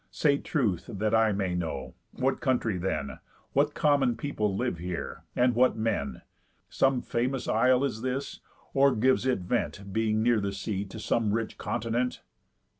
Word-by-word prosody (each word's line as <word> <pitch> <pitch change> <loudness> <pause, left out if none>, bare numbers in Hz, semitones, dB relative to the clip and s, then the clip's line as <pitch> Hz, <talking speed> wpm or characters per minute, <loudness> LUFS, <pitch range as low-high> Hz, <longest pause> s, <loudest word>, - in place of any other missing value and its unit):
Say 140 -2 +2
truth, 110 - -1
that 105 0 -1
I 110 -1 +4
may 95 -2 -1
know, 75 -7 -3 0.2
what 130 +1 0
country 125 -6 +1
then, 85 -6 -3 0.3
What 145 +2 +2
common 140 -5 +3
people 105 -9 -1
live 120 -8 -1
here, 90 0 -5
and 125 0 +3
what 125 +1 +3
men? 105 - -2 0.5
Some 135 -2 +2
famous 125 +1 -1
isle 125 +4 +3
is 120 -6 -2
this? 130 +2 -3 0.3
Or 140 0 +4
gives 130 +3 +2
it 125 -7 +1
vent, 100 -1 -2
Being 110 0 +1
near 120 -1 +3
the 100 0 -2
sea, 100 0 -3
to 100 +3 -9
some 110 -1 +1
rich 115 -1 -3
continent?" 120 +3 -2
115 Hz, 160 wpm, -28 LUFS, 100-130 Hz, 0.5 s, I